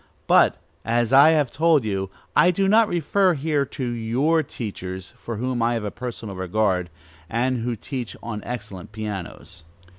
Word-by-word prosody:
But, - - +5 0.3
as 120 +1 +1
I 140 +3 +8
have 150 -6 +2
told 160 -3 +3
you, 95 -2 -2 0.3
I 180 - +6
do 195 +2 +1
not 220 +2 +5
refer 180 +2 +2
here 145 -1 0
to 130 -1 -5
your 120 +8 +1
teachers, 95 - -6
for 120 -2 -6
whom 125 +1 -2
I 120 +1 +2
have 115 - -2
a 105 - -3
personal 120 -5 -6
regard, 95 -1 0 0.4
and 125 +2 0
who 120 +1 -2
teach 120 -1 -6
on 110 -3 -5
excellent 105 -5 -7
pianos. 100 -5 -7
120 Hz, 160 wpm, -23 LUFS, 105-145 Hz, 0.4 s, I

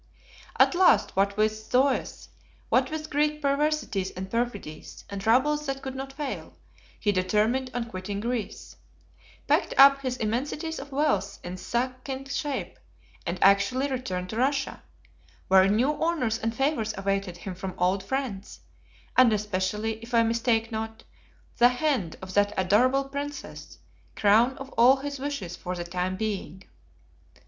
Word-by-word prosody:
At - - +6
last, 365 +1 +4
what 200 +1 +1
with 215 0 +3
Zoes, 255 +5 0 0.4
what 260 +1 +3
with 310 0 -5
Greek 300 +1 +1
perversities 280 -9 0
and 190 +1 -7
perfidies, 230 -9 -4
and 200 -1 -4
troubles 275 +7 +2
that 270 0 -3
could 265 - -4
not 270 +1 -6
fail, 280 -1 -6 0.4
he 205 - +2
determined 215 +7 +1
on 245 -1 -1
quitting 200 -1 -5
Greece; 235 -1 -4 0.7
packed - - +1
up 275 0 +8
his 255 -2 -2
immensities 285 +9 -2
of 280 +1 -9
wealth 210 -9 0
in 175 +1 -5
succinct 255 +6 -3
shape, 290 -3 -3 0.5
and 170 +2 -2
actually 200 +8 +4
returned 185 -8 -3
to 220 - -5
Russia, 275 +2 0 0.7
where 190 0 +6
new 230 +8 +2
honors 255 -10 0
and 225 +1 -2
favors 270 -6 0
awaited 195 -2 -2
him 190 +1 -6
from 185 +1 -6
old 185 +2 +1
friends, 235 -5 -4 0.5
and 255 -2 +6
especially, 210 +1 -1
if 235 +1 -5
I 230 - +6
mistake 230 0 +1
not, 220 0 -5 0.5
the 240 +1 +7
hand 250 - -1
of 185 0 -7
that 205 +1 +2
adorable 245 +9 +3
Princess, 275 - -7 0.4
crown 225 +6 +4
of 270 0 -9
all 250 +3 +6
his 280 0 -5
wishes 265 -11 -4
for 180 +1 -5
the 175 - -4
time 180 +2 -3
being. 200 -3 -4
230 Hz, 145 wpm, -27 LUFS, 195-270 Hz, 0.7 s, up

